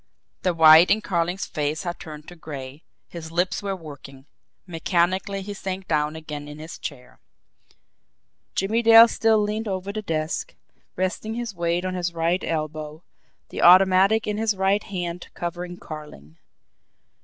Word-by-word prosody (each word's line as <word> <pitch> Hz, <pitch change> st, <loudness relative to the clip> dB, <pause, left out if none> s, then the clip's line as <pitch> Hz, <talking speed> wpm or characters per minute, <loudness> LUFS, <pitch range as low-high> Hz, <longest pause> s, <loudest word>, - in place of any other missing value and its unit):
The 180 Hz, -2 st, 0 dB
white 160 Hz, +1 st, +8 dB
in 215 Hz, -, +3 dB
Carling's 175 Hz, -1 st, -1 dB
face 150 Hz, +3 st, -3 dB
had 175 Hz, -1 st, -5 dB
turned 155 Hz, -1 st, -10 dB
to 175 Hz, -, -12 dB
gray, 140 Hz, -3 st, -9 dB, 0.3 s
his 160 Hz, -2 st, -9 dB
lips 180 Hz, +2 st, 0 dB
were 200 Hz, -1 st, -3 dB
working 140 Hz, -5 st, -12 dB, 0.4 s
mechanically 185 Hz, +3 st, -1 dB
he 205 Hz, +1 st, -6 dB
sank 190 Hz, -1 st, -6 dB
down 150 Hz, -1 st, 0 dB
again 150 Hz, -2 st, -7 dB
in 150 Hz, 0 st, -9 dB
his 160 Hz, +2 st, -9 dB
chair. 125 Hz, 0 st, -9 dB, 1.4 s
Jimmie 215 Hz, +5 st, +1 dB
Dale 230 Hz, 0 st, +9 dB
still 225 Hz, -1 st, +2 dB
leaned 210 Hz, +1 st, -1 dB
over 195 Hz, 0 st, -4 dB
the 215 Hz, -, -3 dB
desk, 165 Hz, -, -3 dB, 0.4 s
resting 185 Hz, +4 st, -2 dB
his 235 Hz, -3 st, -4 dB
weight 170 Hz, 0 st, -1 dB
on 185 Hz, -, -2 dB
his 175 Hz, -1 st, -3 dB
right 170 Hz, +2 st, 0 dB
elbow, 155 Hz, 0 st, -4 dB, 0.5 s
the -, -, -5 dB
automatic 190 Hz, +4 st, +6 dB
in 210 Hz, -1 st, -2 dB
his 220 Hz, -2 st, +1 dB
right 195 Hz, +2 st, +2 dB
hand 175 Hz, -4 st, -5 dB
covering 175 Hz, +1 st, -5 dB
Carling. 150 Hz, -, -11 dB
175 Hz, 150 wpm, -24 LUFS, 155-195 Hz, 1.4 s, Dale